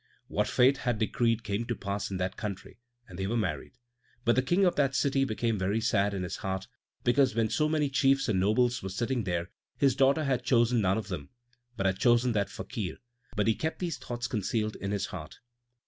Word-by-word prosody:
What - - 0
fate 130 +3 +4
had 120 -4 -1
decreed 115 +1 +1
came 105 +2 -2
to 120 - -2
pass 100 0 -3
in 95 - -3
that 90 +1 -2
country, 100 -1 -6 0.3
and 90 -4 -10
they 95 - -1
were 115 +3 0
married. 85 -10 -2 0.5
But 120 - +4
the 130 - +4
King 175 +9 +2
of 180 - +2
that 135 -2 +1
city 135 -1 +2
became 115 -2 -1
very 100 +4 +1
sad 105 -3 +1
in 95 - -2
his 90 - -4
heart, 95 0 -3 0.4
because 130 +1 +3
when 115 -2 +1
so 150 0 +2
many 155 -2 +1
chiefs 135 0 +2
and 105 -5 +1
nobles 120 +6 +2
were 95 - -4
sitting 120 +4 -1
there 85 0 -2 0.3
his 135 -3 +3
daughter 140 +3 +3
had 130 -3 0
chosen 120 -2 +3
none 95 +1 +2
of 110 -1 -4
them, 75 -7 -5 0.5
but 95 - -1
had 95 0 +1
chosen 120 +1 +4
that 100 -3 0
Fakir; 95 -8 -5 0.4
but 105 - +1
he 115 - +4
kept 160 +8 -3
these 175 -2 -3
thoughts 120 0 -5
concealed 110 -1 -1
in 100 - -4
his 100 -1 -1
heart. 75 -6 -8
115 Hz, 215 wpm, -29 LUFS, 100-130 Hz, 0.5 s, fate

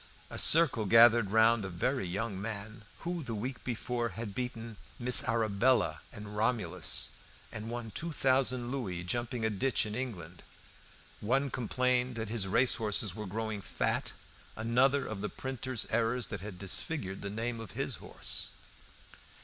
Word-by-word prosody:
A - - -3
circle 150 -9 +5
gathered 115 -1 +7
round 110 +1 +4
a 95 - -4
very 95 +5 -1
young 100 +2 -3
man 105 0 -6 0.2
who 175 0 -3
the 120 -6 -4
week 125 +5 -5
before 120 0 -2
had 110 -3 -5
beaten 115 -2 -5 0.2
"Miss 125 0 +6
Arabella" 115 +1 +2
and 105 -2 -9
"Romolus," 105 -6 +1 0.4
and 110 0 -6
won 120 -2 -5
two 165 +8 -3
thousand 130 -3 +1
louis 95 -11 -3
jumping 120 +4 -2
a 110 - +1
ditch 120 +5 +1
in 105 - -5
England. 95 -9 -5 0.8
One 135 +5 +1
complained 125 +1 0
that 110 -2 -4
his 110 -4 -2
racehorses 110 -2 +1
were 105 +1 -6
growing 110 +1 -3
fat; - - -1 0.4
another 125 +5 +2
of 105 -3 -5
the 105 - -2
printers' 130 -2 -3
errors 115 +2 +1
that 100 -4 -5
had 100 -2 -7
disfigured 95 - -2
the 100 - -4
name 115 +3 -3
of 115 - -9
his - - -2
horse. - - -1
115 Hz, 150 wpm, -31 LUFS, 105-125 Hz, 0.8 s, gathered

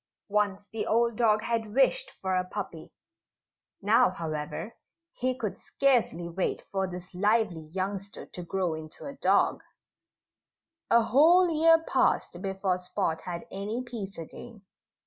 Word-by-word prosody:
Once 205 -1 0
the 225 - -3
old 235 +1 +2
dog 215 -2 +3
had 225 -2 -2
wished - - +3
for 190 -1 0
a 185 - +2
puppy. 180 - -7 0.9
Now, 210 +1 +5
however, 160 +4 -5 0.4
he 255 0 -2
could 215 -6 -4
scarcely 240 - +1
wait 175 +2 -2
for 195 -1 0
this 180 0 -9
lively 205 -4 +1
youngster 195 +3 -4
to 180 - -9
grow 180 -1 -1
into 155 -1 -9
a 280 - -6
dog. 275 - +2 1.3
A 235 0 +5
whole 335 +9 +5
year 325 +1 +5
passed - - +1
before 190 -2 -1
Spot 180 -3 -2
had 170 -1 -5
any 210 +6 -3
peace 220 -6 -7
again. 205 +6 -10
205 Hz, 135 wpm, -28 LUFS, 180-235 Hz, 1.3 s, Now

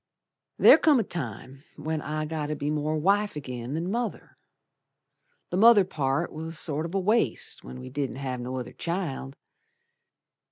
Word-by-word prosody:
There - - +8
come 295 -5 +5
a - - +2
time 135 - -6
when 155 0 -3
I 155 +1 -3
got 155 -1 -3
to 150 - -2
be 145 +1 -2
More 155 +1 -1
wife 200 +3 +1
agin 125 -1 -5
than 170 +4 -2
mother. 235 +2 -3 1.2
The 180 - 0
mother 215 -1 +7
part 140 -6 -1
was 160 +1 -6
sort 155 +1 -1
of 170 - -7
a - - +3
waste 195 - +1
When 65 +1 -9
we 130 - -9
didn't 140 -2 -3
have 130 -2 -4
no 125 +1 -4
other 125 - -6
child. 160 -6 -4
155 Hz, 165 wpm, -27 LUFS, 135-180 Hz, 1.2 s, There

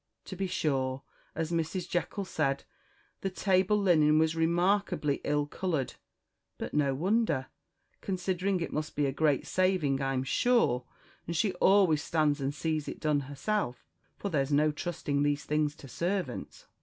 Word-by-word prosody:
To 190 - -7
be 190 +1 -2
sure, 135 -6 -1 0.3
as 160 +1 -2
Mrs 170 +2 -1
Jekyll 190 +3 -2
said, 135 -6 -1 0.6
the 195 - -2
table 190 +1 +2
linen 155 -6 +4
was 160 +1 +2
remarkably 170 -2 +1
ill 145 0 +1
coloured 155 -3 -2 0.6
but - - -5
no 140 -2 +2
wonder, 190 - +1 0.5
considering 185 0 -1
it 165 - -3
must 150 0 -3
be 145 - +1
a 135 - +1
great 145 -1 +1
saving, 185 -8 +1
I'm 135 -1 0
sure 135 - +2 0.4
and 170 - -3
she 200 +1 +1
always 185 -4 +4
stands 150 -3 +1
and 135 +1 0
sees 155 0 -2
it - - -6
done 150 -2 +2
herself, 140 - -3 0.3
for 200 - -3
there's 140 -4 0
no 150 +2 +4
trusting 150 -2 -2
these 145 0 0
things 150 0 0
to 140 - -12
servants. 185 - -3
155 Hz, 155 wpm, -30 LUFS, 145-185 Hz, 0.6 s, linen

